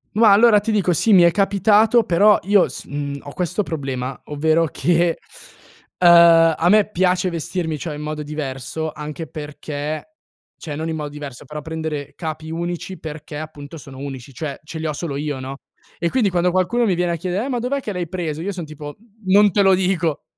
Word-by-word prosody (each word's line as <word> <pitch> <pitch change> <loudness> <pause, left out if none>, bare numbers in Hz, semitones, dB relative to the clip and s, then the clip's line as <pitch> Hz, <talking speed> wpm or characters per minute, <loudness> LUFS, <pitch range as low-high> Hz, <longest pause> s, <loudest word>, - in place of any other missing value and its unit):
Ma 220 -1 +6
allora 210 +1 +6
ti 225 +2 -2
dico 195 -4 +2
sì, 215 +7 +1
mi 185 -4 +7
è 170 - +6
capitato, 210 +5 +3
però 205 +4 +5
io 200 0 +3
s - - -8
uhm, 145 0 -4
ho 145 - -9
questo 180 +3 -1
problema, 135 -6 -4
ovvero 160 +3 +1
che 170 +2 +1 0.8
ehm, 170 -2 +7
a 170 - +2
me 210 +1 +5
piace 185 -1 +1
vestirmi, 165 -1 -3
cioè, 155 -1 -5
in 150 - -7
modo 150 0 -4
diverso 150 0 -4
anche 150 +2 -7
perché, 150 - -6 0.5
cioè 150 -4 -6
non 160 +2 -4
in 160 - -3
modo 150 -1 -4
diverso, 145 -4 -9
però 150 0 -7
prendere 160 -3 -5
capi 160 -1 -6
unici 175 +2 -4
perché 150 -1 -7
appunto 155 0 -9
sono 135 -2 -12
unici, 135 -1 -8
cioè 140 +1 -5
ce 160 +1 -8
li 160 - -4
ho 155 - -1
solo 145 -1 -4
io, 145 -1 -3
no. 130 +1 -6 0.4
E 170 - -1
quindi 235 -6 +2
quando 180 0 +1
qualcuno 185 +7 +1
mi 200 - +2
viene 175 0 0
a - - 0
chiedere: 180 +6 -2
"Eh, - - -4
ma 250 - -1
dov'è 250 +4 -1
che 220 -6 -5
l'hai 180 -2 -3
preso?", 160 -3 -4
io 200 - -2
son 180 -4 -6
tipo: 150 -1 -9 0.3
"Non 200 +2 +5
te 200 +3 +3
lo 195 - +5
dico, 180 -4 0
165 Hz, 205 wpm, -20 LUFS, 150-185 Hz, 0.8 s, mi